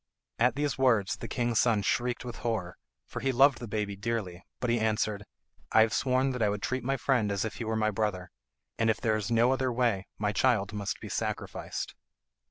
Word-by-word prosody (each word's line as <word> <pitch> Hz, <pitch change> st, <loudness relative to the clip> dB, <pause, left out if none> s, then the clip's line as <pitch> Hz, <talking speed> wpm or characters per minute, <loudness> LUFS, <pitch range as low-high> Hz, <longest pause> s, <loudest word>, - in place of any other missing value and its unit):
At 125 Hz, +2 st, +3 dB
these 145 Hz, -1 st, -1 dB
words 115 Hz, -7 st, +3 dB
the -, -, -6 dB
king's 120 Hz, -3 st, 0 dB
son 110 Hz, -4 st, +3 dB
shrieked 125 Hz, +3 st, 0 dB
with 120 Hz, -, -6 dB
horror, 100 Hz, -7 st, -2 dB, 0.3 s
for -, -, -6 dB
he 135 Hz, +3 st, 0 dB
loved 135 Hz, +1 st, +5 dB
the 120 Hz, -, -6 dB
baby 105 Hz, -1 st, -2 dB
dearly, 100 Hz, -4 st, -3 dB, 0.2 s
but 125 Hz, -, 0 dB
he 120 Hz, -, +2 dB
answered, 110 Hz, -1 st, 0 dB, 0.5 s
"I 110 Hz, -, +6 dB
have 110 Hz, 0 st, +3 dB
sworn 130 Hz, +1 st, +2 dB
that 125 Hz, -2 st, -4 dB
I 105 Hz, -, +3 dB
would 105 Hz, 0 st, -3 dB
treat 130 Hz, -2 st, -1 dB
my 135 Hz, +2 st, 0 dB
friend 120 Hz, -7 st, +1 dB
as 100 Hz, +2 st, -1 dB
if 110 Hz, -, -5 dB
he 115 Hz, -, -4 dB
were 110 Hz, 0 st, -1 dB
my 110 Hz, 0 st, +1 dB
brother, 100 Hz, -4 st, -2 dB, 0.5 s
and 115 Hz, 0 st, +3 dB
if 110 Hz, -, +1 dB
there 110 Hz, -3 st, +1 dB
is 110 Hz, 0 st, -2 dB
no 120 Hz, +2 st, +4 dB
other 130 Hz, -1 st, 0 dB
way 115 Hz, -6 st, 0 dB
my 105 Hz, -1 st, 0 dB
child 105 Hz, -2 st, +2 dB
must 100 Hz, -2 st, -3 dB
be -, -, -7 dB
sacrificed." -, -, -4 dB
115 Hz, 215 wpm, -29 LUFS, 105-125 Hz, 0.5 s, I